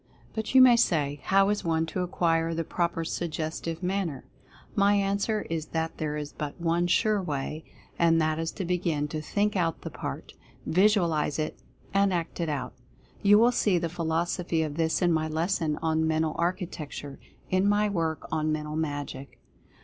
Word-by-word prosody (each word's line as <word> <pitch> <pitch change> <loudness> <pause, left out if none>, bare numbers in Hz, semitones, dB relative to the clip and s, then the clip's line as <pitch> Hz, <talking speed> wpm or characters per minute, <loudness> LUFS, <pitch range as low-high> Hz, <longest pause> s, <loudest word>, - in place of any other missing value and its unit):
But, 220 +3 -4
you 260 - +10
may 245 -2 +7
say, 145 -9 +1
how 195 +1 +4
is 205 0 0
one 160 -1 +1
to 165 - -4
acquire 165 -2 +1
the 165 - -1
proper 170 0 -1
Suggestive 165 +1 -3
Manner? 180 -6 -2 0.5
My 200 +1 +4
answer 200 +2 0
is 160 -2 -3
that 160 0 -3
there 150 -1 -2
is 150 -1 -5
but 150 +1 -5
one 170 +1 +1
sure 210 +3 +2
way, 150 -1 -4 0.4
and 165 -1 +4
that 155 0 +1
is 165 0 -2
to 190 - -4
begin 170 -4 0
to 155 0 -3
Think 205 +6 0
Out 165 -3 0
the - - -6
Park; - - -6 0.3
Visualize 175 -6 +2
it; 155 -1 -3 0.3
and 195 0 +3
Act 170 -1 -3
it 165 -2 -1
Out. 135 -4 -3 0.5
You 205 0 +6
will 235 +3 +5
see 205 -6 +2
the 170 -1 -1
philosophy 170 0 -1
of 150 -2 -4
this 165 +2 +1
in 175 -1 +4
my 155 0 +1
lesson 160 -1 0
on 160 0 +1
"Mental 160 0 +1
Architec 175 -3 -3
ture," 140 -1 -9 0.3
in 185 +2 +3
my 210 +1 +3
work 165 -5 -2
on 155 0 0
"Mental 150 0 -3
Magic." 145 -3 -4
165 Hz, 180 wpm, -27 LUFS, 155-185 Hz, 0.5 s, you